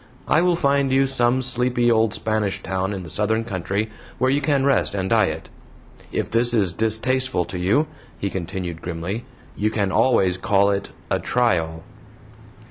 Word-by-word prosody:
I 155 Hz, -, +4 dB
will 180 Hz, -1 st, +3 dB
find 140 Hz, -3 st, +1 dB
you 135 Hz, +1 st, +4 dB
some 130 Hz, -1 st, +1 dB
sleepy 125 Hz, -1 st, +1 dB
old 110 Hz, -2 st, +2 dB
Spanish 110 Hz, -3 st, -1 dB
town 95 Hz, +1 st, -2 dB
in 95 Hz, -2 st, -5 dB
the 85 Hz, -, -9 dB
southern 110 Hz, +4 st, 0 dB
country 100 Hz, +1 st, -3 dB, 0.3 s
where 130 Hz, 0 st, +2 dB
you 140 Hz, +1 st, +1 dB
can 140 Hz, -1 st, +1 dB
rest 135 Hz, -6 st, +2 dB
and 95 Hz, -1 st, -1 dB
diet. 95 Hz, -8 st, +1 dB, 0.6 s
If -, -, -2 dB
this 120 Hz, +1 st, +4 dB
is 95 Hz, -6 st, +2 dB
distasteful 110 Hz, -1 st, +1 dB
to 90 Hz, +1 st, -6 dB
you," 105 Hz, -, +2 dB, 0.3 s
he 100 Hz, -, -3 dB
continued, 90 Hz, -2 st, -5 dB
grimly, 90 Hz, +6 st, -4 dB, 0.3 s
"you 105 Hz, +1 st, 0 dB
can 100 Hz, -3 st, -1 dB
always 95 Hz, -8 st, +2 dB
call 100 Hz, +1 st, +3 dB
it 100 Hz, 0 st, -2 dB, 0.2 s
'a -, -, +2 dB
trial.'" 80 Hz, -10 st, 0 dB
110 Hz, 165 wpm, -22 LUFS, 95-125 Hz, 0.6 s, I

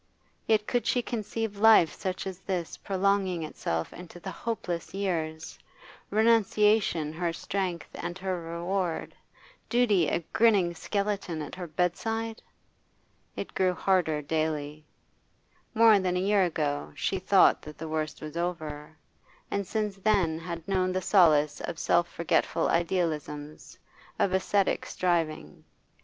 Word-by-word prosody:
Yet 215 Hz, -1 st, +3 dB
could 245 Hz, +1 st, -1 dB
she 245 Hz, -, +2 dB
conceive 220 Hz, -2 st, -4 dB
life 215 Hz, -6 st, +6 dB
such 185 Hz, -1 st, -4 dB
as 190 Hz, -1 st, -6 dB
this 180 Hz, -4 st, -3 dB
prolonging 190 Hz, -3 st, 0 dB
itself 80 Hz, -, -3 dB
into 175 Hz, 0 st, -11 dB
the 190 Hz, +2 st, -6 dB
hopeless 180 Hz, -4 st, -4 dB
years, 160 Hz, -5 st, -3 dB, 0.5 s
renunciation 210 Hz, -6 st, +3 dB
her 170 Hz, +1 st, -1 dB
strength 180 Hz, 0 st, -3 dB
and 175 Hz, -, -5 dB
her 185 Hz, -2 st, -3 dB
reward, 170 Hz, +1 st, -3 dB, 0.6 s
duty 215 Hz, -9 st, +3 dB
a 170 Hz, -, 0 dB
grinning 200 Hz, -7 st, +4 dB
skeleton 200 Hz, -2 st, -2 dB
at 145 Hz, -, -9 dB
her 180 Hz, -2 st, -6 dB
bedside? 225 Hz, +8 st, -2 dB, 0.9 s
It -, -, -6 dB
grew 185 Hz, -1 st, +1 dB
harder 170 Hz, -6 st, +1 dB
daily. 155 Hz, -1 st, -2 dB, 0.9 s
More 220 Hz, -2 st, +7 dB
than 180 Hz, -1 st, 0 dB
a -, -, +1 dB
year 195 Hz, 0 st, +3 dB
ago 150 Hz, -4 st, -2 dB
she 185 Hz, +6 st, -1 dB
thought 190 Hz, +1 st, +5 dB
that 150 Hz, 0 st, -11 dB
the 160 Hz, -, -6 dB
worst 155 Hz, 0 st, -3 dB
was 155 Hz, 0 st, -7 dB
over, 155 Hz, -3 st, -4 dB, 0.5 s
and 200 Hz, -2 st, -1 dB
since 210 Hz, -2 st, -2 dB
then 190 Hz, -6 st, +1 dB
had 170 Hz, -1 st, -7 dB
known 185 Hz, -1 st, +1 dB
the 185 Hz, 0 st, -1 dB
solace 155 Hz, -6 st, +4 dB
of 175 Hz, -, -5 dB
self 170 Hz, +1 st, +2 dB
forgetful 165 Hz, 0 st, +1 dB
idealisms, 155 Hz, -4 st, -2 dB, 0.4 s
of 190 Hz, -, +1 dB
ascetic 190 Hz, +1 st, +1 dB
striving. 160 Hz, -, -1 dB
180 Hz, 130 wpm, -28 LUFS, 160-200 Hz, 0.9 s, More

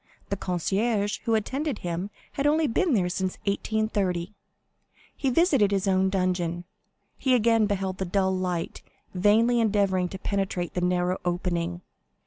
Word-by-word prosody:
The 200 Hz, -, 0 dB
concierge 200 Hz, +4 st, -1 dB
who 230 Hz, -, +2 dB
attended 270 Hz, +7 st, -1 dB
him 175 Hz, +3 st, -4 dB, 0.2 s
had 280 Hz, +1 st, 0 dB
only 310 Hz, +2 st, +3 dB
been 285 Hz, +3 st, +1 dB
there 185 Hz, -4 st, +2 dB
since 185 Hz, +1 st, -2 dB
1830. 200 Hz, -3 st, -1 dB, 0.8 s
He 270 Hz, -, 0 dB
visited 275 Hz, -, +3 dB
his 195 Hz, -1 st, 0 dB
own 190 Hz, 0 st, +3 dB
dungeon. 180 Hz, -2 st, -1 dB, 0.6 s
He 260 Hz, -2 st, +3 dB
again 225 Hz, -2 st, +3 dB
beheld 190 Hz, -2 st, -2 dB
the 190 Hz, -, -1 dB
dull 190 Hz, +1 st, +1 dB
light 180 Hz, -2 st, -3 dB, 0.3 s
vainly 220 Hz, +6 st, +3 dB
endeavoring 200 Hz, -5 st, +2 dB
to 190 Hz, -, -6 dB
penetrate 190 Hz, -3 st, -2 dB
the 180 Hz, -, -2 dB
narrow 180 Hz, +1 st, +1 dB
opening. 175 Hz, -1 st, -2 dB
195 Hz, 140 wpm, -26 LUFS, 180-220 Hz, 0.8 s, only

